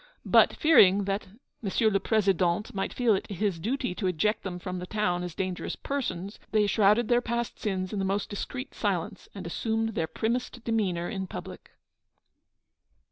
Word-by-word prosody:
But, - - +5
fearing 205 - +6
that 195 +1 -2
M. 205 +5 -20 0.5
le 195 - +2
Président 195 -2 +1
might 195 -1 -2
feel 245 -3 +2
it 195 - -2
his 200 -3 -1
duty 250 - -1
to 190 +1 -2
eject 210 +5 +1
them 185 -2 -5
from 180 0 -5
the 180 - -6
town 180 -4 0
as 175 -2 -5
dangerous 185 -2 -3
persons, 200 -8 -4
they 215 -1 +4
shrouded 210 +2 +4
their 240 0 +3
past 235 -1 -3
sins 185 -2 -2
in 205 - -1
the - - 0
most 195 +1 0
discreet 250 +6 -5
silence, - - -2
and - - -7
assumed 225 -1 -1
their 165 -7 -2
primmest 240 +3 -2
demeanour 195 -7 0
in 190 -4 -4
public. - - -8
200 Hz, 170 wpm, -28 LUFS, 185-225 Hz, 0.5 s, fearing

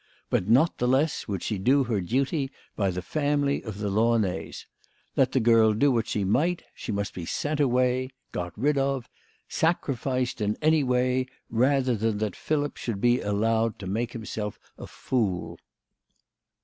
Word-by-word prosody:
But 90 - +1
not 145 +9 +4
the 125 - +1
less 135 +4 +1
would 100 -4 -3
she 105 -4 -2
do 135 +8 +4
her 115 -5 -1
duty 135 - 0 0.3
by 100 -2 +1
the 90 0 -4
family 145 - 0
of 110 -4 -7
the 105 -1 -2
Launays. 105 -5 0 0.5
Let 130 -1 +3
the 130 - +2
girl 110 -2 +5
do 140 +6 +3
what 115 -2 0
she 105 - -1
might, 160 - +1
she - - -6
must 100 -1 -2
be 90 - -6
sent 145 - -2
away 130 -1 +2 0.2
got 90 -1 -5
rid 140 +5 +2
of 135 -2 -1 0.4
sacrificed 130 -6 -1
in 105 0 0
any 155 -1 +3
way 125 0 +1 0.2
rather 130 +1 +2
than 110 0 0
that 105 -3 -2
Philip 145 -2 -1
should 115 -5 -3
be 120 +3 +3
allowed 110 +2 +1
to 100 - -8
make 115 +5 -2
himself 110 -2 -5 0.2
a - - -9
fool. 90 -9 -2
120 Hz, 165 wpm, -26 LUFS, 105-135 Hz, 0.5 s, girl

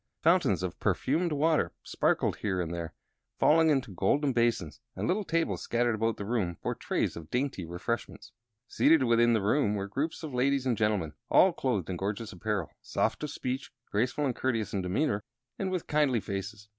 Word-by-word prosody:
Fountains 160 - +3
of 90 - -4
perfumed 165 +5 +1
waters 155 +2 +2
sparkled - - +1
here 95 -3 -1
and 85 -1 -2
there, 85 -1 -5 0.4
falling 160 +1 +5
into 130 -8 +1
golden 135 - +1
basins; 115 -9 0 0.2
and - - -2
little 200 +4 +1
tables 165 -3 0
scattered 120 0 +1
about 110 0 0
the 100 - -5
room 100 -7 -1
bore - - 0
trays - - -1
of 80 -2 -9
dainty 125 -6 -1
refreshments. 90 +8 -4 0.4
Seated 155 +3 +4
within 120 -1 +4
the 110 -3 +1
room 105 0 +2
were 100 -1 -3
groups 145 +12 -3
of 150 -4 -5
ladies 135 +1 +1
and 125 -3 +2
gentlemen, 105 -8 0 0.2
all 185 -1 +6
clothed 120 - -1
in 90 - -3
gorgeous 105 +3 -3
apparel, 90 - -2
soft - - -1
of 150 - -2
speech, 130 -1 -4 0.2
graceful 125 +7 0
and 130 -4 -1
courteous 115 -5 -1
in 100 - 0
demeanor, 100 +3 0 0.4
and 190 - -1
with 185 -3 -2
kindly 145 -5 +2
faces. 100 +1 -6
120 Hz, 180 wpm, -29 LUFS, 100-145 Hz, 0.4 s, all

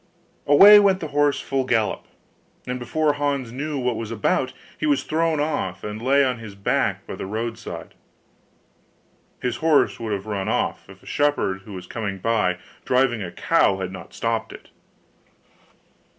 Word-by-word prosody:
Away 200 +9 +9
went 195 -2 +3
the 155 - -5
horse 145 0 +2
full 135 -1 -1
gallop; 115 -4 0 0.6
and 125 0 -4
before 150 +5 0
Hans 140 -4 -2
knew 145 +4 -4
what 125 -2 0
he - - -5
was 115 -2 -5
about, 115 -3 0 0.3
he 155 - 0
was 145 -2 +2
thrown 160 0 0
off, 145 - -2
and 105 +1 -5
lay 140 +3 +4
on 125 -2 -1
his 110 -3 -9
back 100 - -1
by - - -7
the - - -6
road 115 +2 -3
side. 115 - -8 1.5
His 125 -2 -1
horse 160 -3 +2
would 115 -2 -4
have 100 -1 -3
ran 100 -3 -3
off, - - -2
if - - -15
a - - -19
shepherd 145 -10 0
who 105 - -10
was 90 -1 -7
coming 100 0 -4
by, 95 -3 +1 0.3
driving 125 -3 +2
a 90 -3 -5
cow, 95 - +2
had 95 -1 -4
not 95 - -10
stopped 115 -1 -2
it. - - -13
120 Hz, 175 wpm, -23 LUFS, 105-145 Hz, 1.5 s, Away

